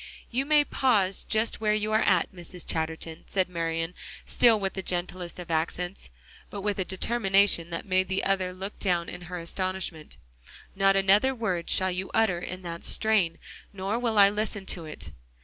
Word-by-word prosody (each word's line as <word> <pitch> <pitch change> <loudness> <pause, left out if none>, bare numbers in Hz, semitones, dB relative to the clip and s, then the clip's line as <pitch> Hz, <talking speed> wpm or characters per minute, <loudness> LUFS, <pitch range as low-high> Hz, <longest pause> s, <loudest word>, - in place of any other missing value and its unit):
"You 260 +3 -1
may 300 -1 +5
pause 205 -10 +1
just 220 0 -1
where 210 -1 +2
you 215 0 -1
are, 220 +1 +3 0.3
Mrs. 175 -1 -7
Chatterton," 160 0 -4
said 190 -2 0
Marian, 165 -1 -2 0.3
still 230 -3 +4
with 195 -1 -2
the 190 - -4
gentlest 180 -1 -3
of 175 -2 -7
accents, 170 - -2 0.4
but 200 - -6
with 205 0 -1
a - - +2
determination 195 -3 +3
that 165 -1 -5
made 185 -1 +1
the 190 0 0
other 190 -2 +1
look 190 +3 -7
down 175 -3 0
at 180 - -8
her 180 +1 -6
in 170 - -6
astonishment, 185 -3 -3 0.6
"not 195 0 +4
another 205 +7 +4
word 185 -8 -2
shall 185 0 +3
you 185 +1 -3
utter 220 -6 +3
in 180 +1 -7
that 170 -1 -6
strain, 200 -7 +2 0.4
nor 200 +4 -2
will 230 -3 -1
I 200 -1 +8
listen 210 -1 -2
to 170 -3 -7
it." 155 - -7
190 Hz, 180 wpm, -27 LUFS, 175-210 Hz, 0.6 s, I